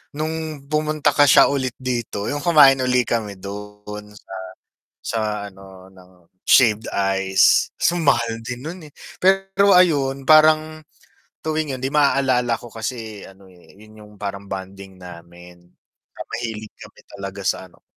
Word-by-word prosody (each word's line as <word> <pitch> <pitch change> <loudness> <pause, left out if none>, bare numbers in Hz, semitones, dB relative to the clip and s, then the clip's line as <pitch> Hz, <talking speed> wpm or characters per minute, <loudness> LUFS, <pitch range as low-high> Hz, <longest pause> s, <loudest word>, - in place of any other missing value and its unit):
no'ng 155 -1 -5
pumunta 155 0 0
ka 145 - +6
siya, 140 - +7
ulit 135 -2 -1
dito, 120 -5 -3
yung 145 0 -3
kumain 145 -6 +6
uli 125 -1 +1
kami 105 -4 -3
do'n, 105 +1 -9
sa 95 - -12 0.7
sa 115 - -2 0.3
ano, 95 -1 -15
ng 95 -1 -19 0.4
shaved 110 -4 +4 0.4
ice. 95 0 +4
So, 175 - +2
mahal 120 -7 +1
din 125 +1 -7
no'n, 170 +5 -7
eh, - - -42 0.3
pero, 195 +1 +3
ayun, 140 -7 +3
parang 155 0 +4 0.6
tuwing 155 -4 -2
'yon, - - -12
'di 135 - -3
maaalala 130 -5 +2
ko 120 -2 -13
kasi 110 -2 -6
ano, 95 0 -16
eh, 90 -2 -20
'yon 110 +1 -16
yung 105 0 -15
parang 100 0 -5
bonding 95 0 -8
namin. 90 0 -14 0.5
Na - - -9
mahilig 110 -2 -5
kami - - -14
talaga 100 0 -8
sa 95 - -1
ano 85 - -26
120 Hz, 145 wpm, -21 LUFS, 100-145 Hz, 0.7 s, siya